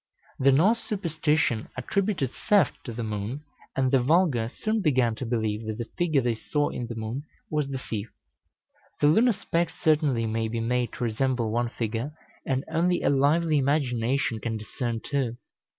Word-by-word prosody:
The 135 +1 +5
Norse 195 - +4
superstition 155 - 0
attributed 185 - 0 0.2
theft 205 -3 +3
to 120 - -4
the 115 +1 -4
moon, 110 +6 -4 0.3
and 130 -1 +2
the 135 -2 +4
vulgar 140 -5 +3
soon 220 - -1
began 130 - +2
to 115 +2 -5
believe 110 -2 -1
that 110 -1 -3
the 120 - -3
figure 160 -5 +2
they 120 -1 +1
saw 145 +6 -1
in 120 - -4
the 115 - -6
moon 110 +4 -4 0.3
was 150 -2 0
the 135 -1 -3
thief. 110 -3 -5 0.9
The - - +3
lunar 220 +12 +5
specks 170 -4 -2
certainly 145 -7 +2
may 110 0 -1
be 115 +1 -3
made 120 +1 0
to - - -4
resemble 120 0 0
one 120 +1 0
figure, 115 +5 -3 0.3
and 130 +1 0
only 170 +2 +1
a - - +3
lively 150 +3 +3
imagination 130 -4 +1
can 115 0 -3
discern 115 +1 -4
two. 130 -5 -1
130 Hz, 170 wpm, -27 LUFS, 115-155 Hz, 0.9 s, The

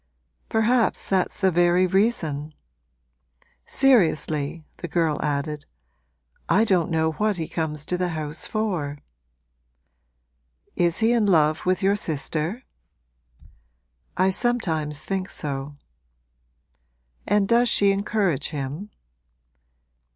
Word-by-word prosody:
'Perhaps 225 +2 +1
that's 190 -2 0
the 190 -2 +3
very 175 +1 +3
reason! 165 -7 0 1.1
Seriously,' 160 - +2
the 175 - -6
girl 165 -2 0
added, 150 0 -3 0.8
'I 195 +6 +4
don't 185 -7 +1
know 160 -1 +1
what 210 +4 -1
he 160 -2 -3
comes 150 -2 -3
to 180 - -2
the 180 - +1
house 155 -1 -4
for.' 180 -10 -2 1.8
'Is 175 +3 +2
he 225 +1 +4
in 230 -3 +2
love 155 -3 +2
with 185 +1 +1
your 200 +1 +3
sister?' 160 - -2 1.5
'I 185 +1 +3
sometimes 160 -10 -1
think 190 -1 -3
so.' 140 0 -5 1.5
'And 205 0 +2
does 240 +2 +4
she 200 -1 +4
encourage 195 - 0
him?' 150 +7 -5
175 Hz, 105 wpm, -24 LUFS, 150-205 Hz, 1.8 s, I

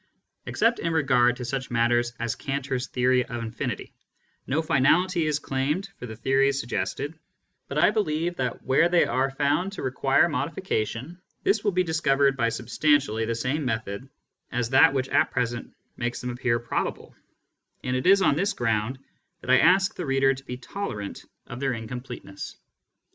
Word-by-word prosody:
Except 230 +1 +2
in 165 0 -1
regard 125 -5 +3
to 125 - -5
such 130 +1 -3
matters 120 0 +2
as 115 -1 -1
Cantor's 135 -2 -3
theory 125 0 +2
of 120 -1 -5
infinity, 115 0 -4 0.5
no 145 +5 0
finality 160 +4 +3
is 150 -1 +1
claimed 150 +7 -2
for 125 - -7
the 110 - -7
theories 135 +4 +2
suggested; 140 +4 -3 0.5
but - - -5
I - - +5
believe 175 -5 0
that 125 -2 -3
where 135 +6 +3
they 175 -1 +4
are 135 +1 +1
found 145 +8 0
to - - -6
require 135 +3 +3
modification, 165 - -3 0.2
this 200 +1 +2
will 205 - +2
be 185 0 +2
discovered 140 -5 +2
by 115 -3 +1
substantially 125 -1 +1
the 115 +1 -1
same 135 +6 -1
method 110 0 -3 0.4
as 120 -1 -1
that 130 0 +7
which 130 0 -1
at - - +3
present 120 -2 -2 0.3
makes 120 0 -2
them 125 - -4
appear 120 -1 0
probable, 120 0 -3 0.7
and 125 0 -1
it 130 +6 -1
is 195 0 +6
on 145 - +4
this 195 +6 0
ground 115 +1 -1 0.4
that 125 - -2
I 130 - +7
ask 190 +3 +4
the 175 - -5
reader 135 0 +3
to 135 +1 -11
be 125 - -5
tolerant 125 - -6 0.2
of 120 - -8
their 135 -2 0
incompleteness. 115 -3 -7
135 Hz, 170 wpm, -26 LUFS, 120-155 Hz, 0.7 s, that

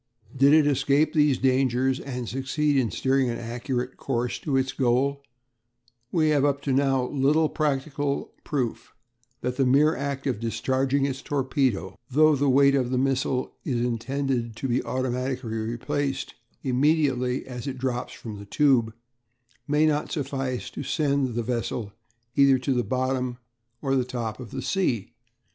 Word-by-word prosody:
Did 135 +2 +5
it 155 -1 +6
escape 145 +1 +2
these 150 -4 +3
dangers 130 0 +2
and 125 -3 -5
succeed 135 +4 0
in 130 -4 +2
steering 130 +1 +1
an 115 - -2
accurate 125 +2 -4
course 125 -2 -2
to 140 -4 0
its 130 0 +1
goal, 135 +2 +1 0.9
we 155 -3 +2
have 145 -2 +3
up 140 -1 +2
to 135 - 0
now 135 -1 +2
little 150 +3 +3
practical 145 -1 -1
proof 130 -6 -3 0.5
that 125 0 -2
the 135 - +3
mere 150 +5 +4
act 140 -1 -3
of 130 -6 -1
discharging 130 +4 0
its 135 -1 -3
torpedo 130 - -1
though 155 +3 +5
the 140 0 +1
weight 140 +1 +5
of 130 -3 +1
the 130 - 0
missile 130 -1 0
is 120 -3 0
intended 125 0 -2
to 135 - -3
be 125 +1 0
automatically 130 -1 -2
replaced 120 +6 -2 0.3
immediately 130 -2 +1
it 130 +1 -5
drops 125 -1 -2
from 110 -3 -8
the 100 - -9
tube 115 -1 +2 0.7
may 150 +2 +3
not 150 -1 0
suffice 135 -3 -3
to - - -6
send 140 -4 0
the 120 - -1
vessel 115 -3 -3 0.4
either 140 -1 +6
to 125 -1 0
bottom 130 +2 -1 0.5
or 135 -2 +2
top 120 -3 -4
of 125 -4 -8
the 135 +3 -5
sea. 125 - -1
130 Hz, 150 wpm, -26 LUFS, 125-140 Hz, 0.9 s, it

